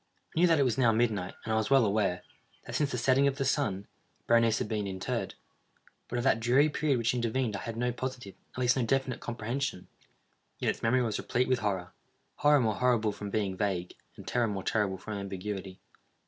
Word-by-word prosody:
I - - +1
knew 180 - +6
that 165 -1 +4
it 140 - +4
was 125 -2 0
now 120 -3 +5
midnight, 110 -5 0
and 110 - -1
I - - +2
was 110 -1 0
well 135 -3 +5
aware, 100 -3 0 0.4
that - - -8
since 145 -2 +1
the - - -2
setting 130 +3 +3
of 135 -1 0
the 135 - -1
sun, 115 -8 0 0.4
Berenice 115 -1 +4
had - - -2
been 105 -3 -2
interred. 95 -1 -3 0.7
But 120 - -3
of 120 - -1
that 125 -4 +3
dreary 130 +6 +4
period 145 -2 +1
which 115 0 +1
intervened 120 -2 -1
I - - -3
had 115 -1 -5
no 125 +1 0
positive, 125 -5 -5 0.2
at - - -12
least 125 -1 +3
no 130 - +1
definite 135 +2 0
comprehension. 120 -3 -4 0.7
Yet - - +1
its - - -9
memory 125 +3 +2
was 110 -3 -1
replete 125 +1 0
with 130 -1 +2
horror—horror 105 +8 -1
more 110 -3 +1
horrible 120 -3 +2
from 105 0 -7
being 100 -3 -1
vague, 95 -3 -2 0.2
and - - -11
terror 120 -2 +1
more 100 -3 -3
terrible 100 -3 0
from 110 +3 -7
ambiguity. 95 -1 -5
115 Hz, 210 wpm, -30 LUFS, 105-130 Hz, 0.7 s, knew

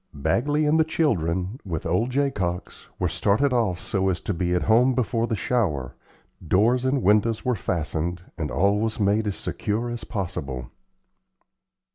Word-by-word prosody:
Bagley 125 - +1
and 155 +2 +3
the - - +6
children, 95 - 0
with 85 -6 -4
old 90 +9 +1
Jacox, 125 -10 -2
were - - 0
started 125 +7 +1
off 110 -8 +1
so 95 0 0
as 90 -2 -1
to 105 - -2
be 90 0 0
at 90 - +1
home 120 +4 +4
before 115 -2 0
the 110 - -1
shower, 90 - -1 0.5
doors 120 +9 +3
and 130 0 +1
windows 105 +3 +2
were 125 - +2
fastened, 85 -2 -2
and 75 -2 -3
all 100 +3 +2
was 110 +1 -2
made 105 +1 +2
as 100 - -1
secure 115 +3 -2
as 120 - -5
possible. 70 - -4
105 Hz, 160 wpm, -24 LUFS, 90-120 Hz, 0.5 s, the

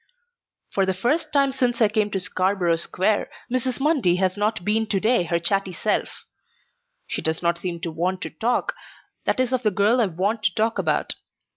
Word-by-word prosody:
For 195 - +1
the 190 - 0
first 300 - 0
time 280 -2 +3
since 250 -3 0
I 220 - +5
came 210 0 0
to 195 - -2
Scarborough 185 -1 +1
Square, 190 +5 0 0.2
Mrs. 255 0 -1
Mundy 270 - +3
has 185 0 +1
not 210 -3 -1
been 220 +1 +1
to 200 -2 +1
day 220 -2 +2
her 170 +1 +1
chatty 195 +3 0
self. 210 +5 -2 0.8
She - - -4
does 160 +2 -2
not 170 0 +1
seem 175 -2 -4
to 170 - -3
want 180 +4 -1
to 160 - -5
talk 240 - 0 0.5
that - - +1
is 255 0 +1
of 255 - +1
the 220 - +2
girl 210 +5 +3
I 220 - +3
want 195 +6 -1
to 185 - +2
talk 225 +1 +1
about. - - 0
205 Hz, 195 wpm, -23 LUFS, 180-235 Hz, 0.8 s, I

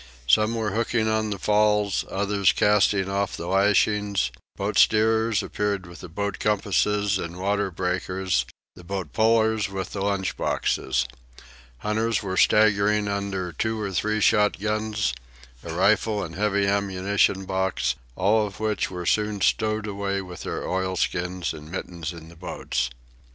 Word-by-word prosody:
Some 110 - +3
were 110 -2 -1
hooking 110 +1 0
on 110 0 0
the 100 - -3
falls, 105 0 +2
others 100 -1 +2
casting 105 -2 +3
off 100 +1 -1
the 85 - -5
lashings; 100 -3 +2 0.2
boat - - -2
steerers 110 0 +3
appeared 100 -2 -2
with 85 0 -12
boat 100 -1 -2
compasses 105 -1 +1
and 85 0 -5
water 100 +1 0
breakers, 95 +1 -1 0.3
and 90 -2 -14
boat 95 -1 -4
pullers 110 -1 +2
with 95 -1 -5
the 100 - -4
lunch 100 -3 -1
boxes. 65 -2 0 0.7
Hunters 110 - -1
were 95 -2 -3
staggering 105 0 +4
under 100 -3 -2
two 110 +7 -2
or 100 -2 -3
three 110 +3 0
shotguns, 105 - +1 0.5
a 85 - -6
rifle 105 +4 +2
and 80 -2 -7
heavy 100 +1 +1
ammunition 100 0 +1
box, 95 0 0 0.2
all 105 +3 +2
of 100 0 -11
which 110 -2 -1
were 90 -1 -6
soon 105 +2 +1
stowed 110 +1 +1
away 100 -1 -2
with 90 -3 -8
their - - -4
oilskins 90 -1 -1
and 75 0 -10
mittens 85 -3 -5
in 85 -2 -11
the 85 - -14
boats. 70 -7 -3
100 Hz, 145 wpm, -25 LUFS, 95-105 Hz, 0.7 s, staggering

